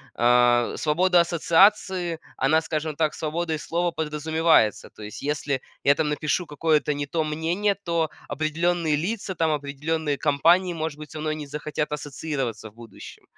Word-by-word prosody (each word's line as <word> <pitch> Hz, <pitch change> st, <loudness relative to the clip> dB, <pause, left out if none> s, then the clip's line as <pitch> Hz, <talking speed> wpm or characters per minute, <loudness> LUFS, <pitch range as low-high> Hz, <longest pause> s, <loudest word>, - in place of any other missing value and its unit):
а, 120 Hz, 0 st, +4 dB
свобода 175 Hz, +3 st, +3 dB
ассоциации, 175 Hz, 0 st, +2 dB, 0.2 s
она 155 Hz, +4 st, +3 dB
скажем 155 Hz, -1 st, -3 dB
так, 155 Hz, 0 st, 0 dB
свободой 160 Hz, 0 st, -2 dB
слова 170 Hz, +2 st, -1 dB
подразумевается. 160 Hz, -6 st, +1 dB
То 110 Hz, -, -13 dB
есть, 105 Hz, -, -8 dB
если 145 Hz, -2 st, -1 dB, 0.2 s
я 140 Hz, -, +5 dB
там 155 Hz, 0 st, 0 dB
напишу 150 Hz, +4 st, -1 dB
какое-то 150 Hz, 0 st, +1 dB
не 145 Hz, 0 st, -3 dB
то 160 Hz, +3 st, -1 dB
мнение, 165 Hz, +7 st, 0 dB
то 165 Hz, -2 st, 0 dB, 0.2 s
определенные 160 Hz, +1 st, 0 dB
лица 190 Hz, +3 st, -3 dB
там, 160 Hz, -1 st, +1 dB
определенные 150 Hz, +1 st, -2 dB
компании, 170 Hz, +6 st, +3 dB
может 160 Hz, -2 st, -4 dB
быть, 150 Hz, -, -10 dB
со 155 Hz, -, -7 dB
мной 155 Hz, 0 st, -1 dB
не 150 Hz, -2 st, -7 dB
захотят 150 Hz, +1 st, -4 dB
ассоциироваться 135 Hz, -6 st, -4 dB
в -, -, -26 dB
будущем. 115 Hz, -3 st, -12 dB
155 Hz, 155 wpm, -24 LUFS, 145-165 Hz, 0.2 s, я